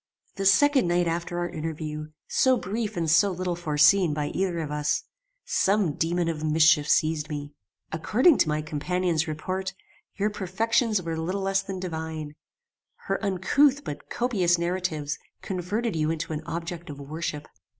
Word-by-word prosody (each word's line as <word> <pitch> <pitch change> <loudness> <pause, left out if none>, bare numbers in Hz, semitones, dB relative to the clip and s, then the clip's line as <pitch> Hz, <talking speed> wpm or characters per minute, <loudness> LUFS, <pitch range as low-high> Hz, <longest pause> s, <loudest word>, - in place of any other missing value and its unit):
"The 195 0 0
second 270 +2 +5
night 175 0 +2
after 170 +1 -2
our 175 0 -1
interview, 155 -2 -5 0.2
so 260 -1 +3
brief 215 +1 -3
and 165 -1 0
so 165 +6 +5
little 180 -1 -2
foreseen 165 +1 +4
by 150 -1 -1
either 185 -2 -1
of 155 -3 -3
us, 150 0 0 0.4
some 205 - +2
daemon 170 +3 0
of 160 -2 -3
mischief 155 -1 +4
seized 155 -2 +2
me. 145 -1 -5 0.4
According 240 - +3
to - - +4
my 150 0 0
companion's 170 +2 -1
report, 185 +5 -3 0.4
your 210 +1 0
perfections 220 +3 +1
were 165 -1 -3
little 185 +5 -2
less 195 0 +1
than 195 -1 -6
divine. 160 -4 -5 0.7
Her - - -2
uncouth 270 +9 +3
but 145 0 -7
copious 190 -8 +1
narratives 170 -4 -2 0.2
converted 195 +4 -2
you 155 -1 +1
into 160 0 -2
an 150 - -3
object 170 +1 -5
of 145 -1 -7
worship. 150 +1 -5
170 Hz, 155 wpm, -26 LUFS, 155-195 Hz, 0.7 s, second